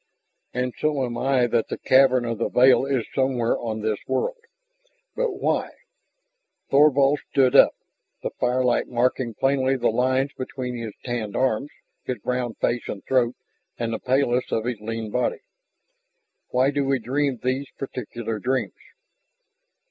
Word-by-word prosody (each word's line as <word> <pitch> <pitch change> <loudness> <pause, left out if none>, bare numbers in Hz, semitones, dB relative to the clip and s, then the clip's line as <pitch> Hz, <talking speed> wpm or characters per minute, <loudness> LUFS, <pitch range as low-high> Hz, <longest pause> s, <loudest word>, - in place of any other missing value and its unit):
"And 125 0 -2
so 150 -4 +1
am 120 -1 -5
I 130 0 +2
that 120 -1 0
the - - -4
cavern 130 -2 +4
of 115 -2 -3
the - - 0
veil 130 +1 +5
is 130 -4 0
somewhere 130 -3 +1
on 110 -2 -4
this 110 -1 -1
world. - - -1 0.8
But - - 0
why?" - - -1 1.0
Thorvald 140 0 +5
stood 130 -3 +3
up, - - +7 0.5
the - - -2
firelight 125 0 +1
marking 120 -1 0
plainly 135 +1 +2
the 120 - +2
lines 130 +4 +1
between 130 -1 -5
his 115 -3 -6
tanned 115 -5 -3
arms, 130 +2 0 0.3
his 125 - -3
brown 125 -2 -2
face 120 0 -1
and 100 - -6
throat, 125 -2 +2 0.4
and 115 -1 -2
the 110 - -3
paleness 130 -1 +1
of 110 - 0
his 120 -3 -2
lean 110 0 -4
body. 125 +2 -1 1.1
"Why 130 +2 +2
do 145 0 0
we 135 0 +1
dream 135 +2 -1
those 130 +3 -2
particular 120 -4 -5
dreams?" 130 +4 -1
125 Hz, 150 wpm, -24 LUFS, 120-135 Hz, 1.1 s, up